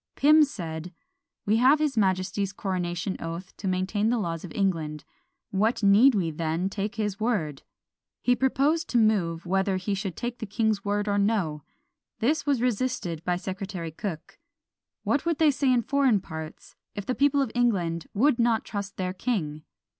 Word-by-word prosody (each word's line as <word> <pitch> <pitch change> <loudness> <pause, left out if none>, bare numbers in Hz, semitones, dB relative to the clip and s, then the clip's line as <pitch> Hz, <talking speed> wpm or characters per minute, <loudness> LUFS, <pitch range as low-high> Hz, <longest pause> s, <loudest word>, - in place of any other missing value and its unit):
Pym 305 +2 +6
said, 175 - -5 0.5
"We 215 +2 +3
have 260 +5 +5
his 300 -2 0
majesty's 190 -1 0
coronation 185 -2 -3
oath 170 +3 -6
to 195 - -5
maintain 190 +4 0
the 240 - +2
laws 165 -6 -3
of 180 - -8
England; 160 -6 -1 0.5
what 215 +4 +1
need 215 +6 +6
we 175 -5 0
then 165 +4 -2
take 205 +3 -3
his 210 -3 -2
word?" 175 - -1 0.6
He 245 - +4
proposed 275 +6 +1
to 245 - +1
move 185 -7 +2
"Whether 190 +2 +1
we 205 - 0
should 195 -3 -3
take 240 0 -4
the 220 - -5
king's 215 0 0
word 205 0 -1
or 205 0 +1
no." 195 -8 0 0.6
This 290 +5 0
was 270 -4 +2
resisted 235 -9 -1
by 180 0 0
Secretary 185 -2 -5
Cooke; 165 -1 -6 0.6
"What 285 - +1
would 335 -3 +1
they 310 -1 +5
say 270 -1 +1
in 245 -2 +3
foreign 270 -6 +3
parts, 160 -3 -9 0.2
if 205 - -5
the 255 - 0
people 285 +2 +3
of 245 - -4
England 180 -9 0
would 250 +4 +3
not 230 -1 +2
trust 200 -1 -5
their 185 -1 -2
king?" 175 -9 -2
200 Hz, 170 wpm, -26 LUFS, 180-240 Hz, 0.6 s, Pym